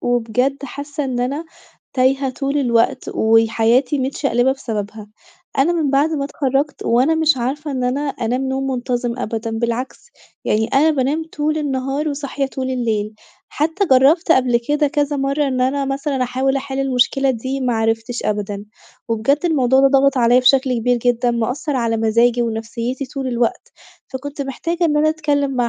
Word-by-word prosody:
وبجد 245 Hz, +3 st, 0 dB
حاسّة 285 Hz, +2 st, -5 dB
إن 250 Hz, -2 st, -2 dB
أنا 280 Hz, +6 st, -2 dB, 0.5 s
تايهة 265 Hz, +1 st, +2 dB
طول 275 Hz, +3 st, -2 dB
الوقت 250 Hz, 0 st, +1 dB
وحياتي 225 Hz, +4 st, +2 dB
متشقلبة 265 Hz, -1 st, +1 dB
بسببها. 215 Hz, -5 st, -6 dB, 0.5 s
أنا 290 Hz, +6 st, +3 dB
من 320 Hz, -5 st, 0 dB
بعد 280 Hz, +3 st, +2 dB
ما 295 Hz, -3 st, -1 dB
اتخرجت 280 Hz, 0 st, -1 dB
وأنا 255 Hz, +7 st, +3 dB
مش 320 Hz, -2 st, +3 dB
عارفة 275 Hz, +5 st, -3 dB
إن 255 Hz, -2 st, -2 dB
أنا 255 Hz, +3 st, 0 dB
أنام 265 Hz, -2 st, -2 dB
نوم 265 Hz, 0 st, -2 dB
منتظم 245 Hz, -1 st, -2 dB
أبدًا 225 Hz, 0 st, -3 dB
بالعكس؛ 240 Hz, -, -3 dB, 0.3 s
يعني 220 Hz, +1 st, +1 dB
أنا 295 Hz, +6 st, +3 dB
بانام 295 Hz, +2 st, 0 dB
طول 305 Hz, +1 st, -1 dB
النهار 275 Hz, +1 st, -2 dB
وصاحية 280 Hz, -1 st, -3 dB
طول 265 Hz, -1 st, -4 dB
الليل. 220 Hz, -4 st, -1 dB, 0.3 s
حتّى 320 Hz, +7 st, 0 dB
جرّبت 295 Hz, +7 st, +5 dB
قبل 250 Hz, -4 st, +2 dB
كده 295 Hz, 0 st, +2 dB
كذا 290 Hz, -1 st, 0 dB
مرّة 275 Hz, +1 st, 0 dB
إن 255 Hz, -1 st, -1 dB
أنا 275 Hz, +2 st, +1 dB
مثلًا 275 Hz, -1 st, -2 dB
أحاول 260 Hz, +2 st, 0 dB
أحل 270 Hz, 0 st, -4 dB
المشكلة 270 Hz, +1 st, +2 dB
دي 260 Hz, +3 st, -3 dB
ما 250 Hz, -2 st, 0 dB
عرفتش 225 Hz, +2 st, -1 dB
أبدًا. 205 Hz, -1 st, -3 dB, 0.4 s
وبجد 230 Hz, +6 st, +1 dB
الموضوع 265 Hz, -6 st, +3 dB
ده 275 Hz, -, +5 dB
ضغط 275 Hz, 0 st, +3 dB
عليَّ 245 Hz, +1 st, +5 dB
بشكل 260 Hz, 0 st, +3 dB
كبير 245 Hz, +2 st, +1 dB
جدًا، 240 Hz, 0 st, +1 dB
مأثر 250 Hz, +5 st, -2 dB
على 230 Hz, -2 st, 0 dB
مزاجي 230 Hz, +2 st, +2 dB
ونفسيتي 230 Hz, +3 st, -3 dB
طول 270 Hz, -1 st, -5 dB
الوقت. 240 Hz, -1 st, -2 dB, 0.4 s
فكنت 280 Hz, +2 st, -5 dB
محتاجة 335 Hz, +6 st, -2 dB
إن 300 Hz, -3 st, +2 dB
أنا 305 Hz, +1 st, +3 dB
أتكلّم 290 Hz, -3 st, 0 dB
مع 245 Hz, -1 st, +1 dB
265 Hz, 160 wpm, -19 LUFS, 240-280 Hz, 0.5 s, جرّبت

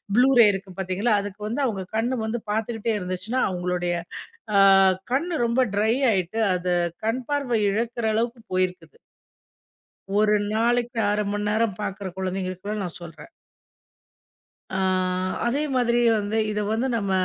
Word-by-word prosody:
Blue 250 Hz, +3 st, +5 dB
ரே 235 Hz, -, +9 dB
இருக்கு 195 Hz, 0 st, -6 dB
பார்த்தீங்களா? 190 Hz, +5 st, 0 dB
அதுக்கு 205 Hz, 0 st, -8 dB
வந்து 240 Hz, +7 st, -2 dB
அவங்க 205 Hz, -6 st, -2 dB
கண்ணு 240 Hz, +4 st, 0 dB
வந்து 225 Hz, +2 st, -2 dB
பார்த்துக்கிட்டே 225 Hz, +1 st, -1 dB
இருந்துச்சுன்னா, 185 Hz, +7 st, -2 dB
அவங்களுடய 180 Hz, -1 st, -1 dB, 0.6 s
அ -, -, +7 dB, 0.5 s
கண்ணு 330 Hz, +6 st, 0 dB
ரொம்ப 235 Hz, +2 st, +2 dB
ட்ரை 215 Hz, +2 st, +2 dB, 0.2 s
ஆயிட்டு, 190 Hz, +2 st, -1 dB
அது 180 Hz, 0 st, -1 dB, 0.3 s
கண் 245 Hz, +3 st, -1 dB
பார்வை 280 Hz, -6 st, 0 dB
இழக்கிற 230 Hz, +2 st, -2 dB
அளவுக்கு 230 Hz, +1 st, -1 dB
போயிருக்குது. 185 Hz, -, -2 dB, 1.2 s
ஒரு 210 Hz, 0 st, +4 dB, 0.2 s
நாளைக்கு 240 Hz, +2 st, +1 dB
1/2 210 Hz, 0 st, 0 dB
மணி 205 Hz, 0 st, -2 dB
நேரம் 220 Hz, -2 st, 0 dB
பார்க்கிற 195 Hz, -1 st, -4 dB
கொழந்தைங்களுக்குதான் 190 Hz, +2 st, -3 dB
நான் 175 Hz, -, -6 dB
சொல்றேன். 170 Hz, -, -11 dB, 1.4 s
ஆ -, -, 0 dB, 0.7 s
அதே 270 Hz, +5 st, 0 dB
மாதிரி 240 Hz, -1 st, +2 dB, 0.2 s
வந்து, 210 Hz, +2 st, -1 dB
இத 210 Hz, 0 st, -1 dB
வந்து 230 Hz, +4 st, 0 dB
நம்ம 200 Hz, -3 st, -2 dB
215 Hz, 135 wpm, -24 LUFS, 190-235 Hz, 1.4 s, ரே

